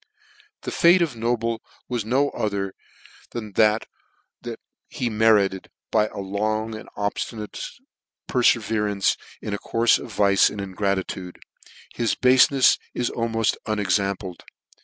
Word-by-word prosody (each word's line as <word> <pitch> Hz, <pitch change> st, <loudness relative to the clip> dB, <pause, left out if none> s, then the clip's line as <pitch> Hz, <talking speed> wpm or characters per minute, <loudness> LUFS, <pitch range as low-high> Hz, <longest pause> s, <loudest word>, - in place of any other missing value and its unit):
The -, -, -4 dB
fate 175 Hz, +1 st, +5 dB
of 150 Hz, -7 st, -3 dB
Noble 115 Hz, 0 st, -1 dB, 0.3 s
was 120 Hz, -3 st, -2 dB
no 135 Hz, +6 st, +1 dB
other 100 Hz, -2 st, -2 dB, 0.6 s
than 110 Hz, -3 st, -5 dB
what 110 Hz, 0 st, +3 dB, 1.0 s
he 120 Hz, -2 st, -2 dB
merited 105 Hz, -3 st, +3 dB, 0.2 s
by 110 Hz, -1 st, +3 dB
a -, -, -11 dB
long 110 Hz, +3 st, -2 dB
and 110 Hz, -, -9 dB
obftinate 105 Hz, +1 st, -4 dB, 0.6 s
perfeverance 105 Hz, -5 st, +2 dB, 0.3 s
in 105 Hz, -, -3 dB
a 100 Hz, -, -2 dB
courfe 115 Hz, 0 st, +2 dB
of -, -, -9 dB
vice 100 Hz, -1 st, +4 dB
and 105 Hz, -, -7 dB
ingratitude: 95 Hz, -2 st, -3 dB, 0.6 s
his 115 Hz, -2 st, 0 dB
bafenefs 130 Hz, +1 st, +5 dB, 0.2 s
is 125 Hz, -, -1 dB
al 115 Hz, 0 st, -2 dB
moft 115 Hz, -1 st, +1 dB
unexampled. 100 Hz, -3 st, -1 dB
110 Hz, 120 wpm, -24 LUFS, 100-115 Hz, 1.0 s, fate